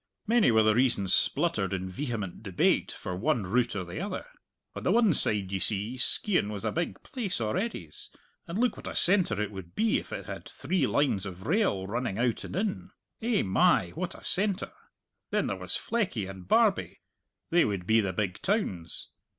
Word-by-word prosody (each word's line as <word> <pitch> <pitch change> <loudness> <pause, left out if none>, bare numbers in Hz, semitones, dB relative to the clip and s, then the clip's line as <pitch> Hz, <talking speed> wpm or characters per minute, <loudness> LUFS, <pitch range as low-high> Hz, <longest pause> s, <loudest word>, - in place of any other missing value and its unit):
Many 230 - +4
were 110 -1 +5
the 110 0 +4
reasons 115 -6 +2
spluttered 95 -1 +2
in 95 -1 -2
vehement 105 -3 -4
debate 95 -5 +1
for 90 - -5
one 115 +4 +1
route 120 +5 +1
or 95 - -2
the 85 +1 -6
other. - - -4 0.5
"On - - -5
the - - +1
one 225 -3 +5
side, 100 -8 +3
ye 95 - -1
see, 105 +5 -1
Skeighan 180 - +1
was 105 -2 -5
a - - +1
big 170 +1 -3
place 220 - -2
a'readys, 110 - -3 0.4
and 170 - -4
look 240 0 +1
what - - -8
a - - -5
centre 175 - +3
it 105 -1 -1
would 95 -4 -9
be 220 0 +2
if - - -12
it - - -5
had - - -7
three 185 -1 0
lines 105 -9 +1
of 95 0 -9
rail 160 - +1
running 115 0 -2
out 120 0 0
and - - -6
in! 200 +1 -2 0.3
Eh, 225 -1 +2
my, 170 - +3
what 180 +3 -4
a - - -13
centre! 200 0 0 0.6
Then - - +1
there - - -1
was - - -3
Fleckie 185 - -1
and 95 -2 -9
Barbie - - +2 0.5
they 175 0 +5
would 100 -4 -2
be 110 +3 +4
the 100 -3 -1
big 95 0 -2
towns! 105 - -2
115 Hz, 190 wpm, -29 LUFS, -, 0.6 s, were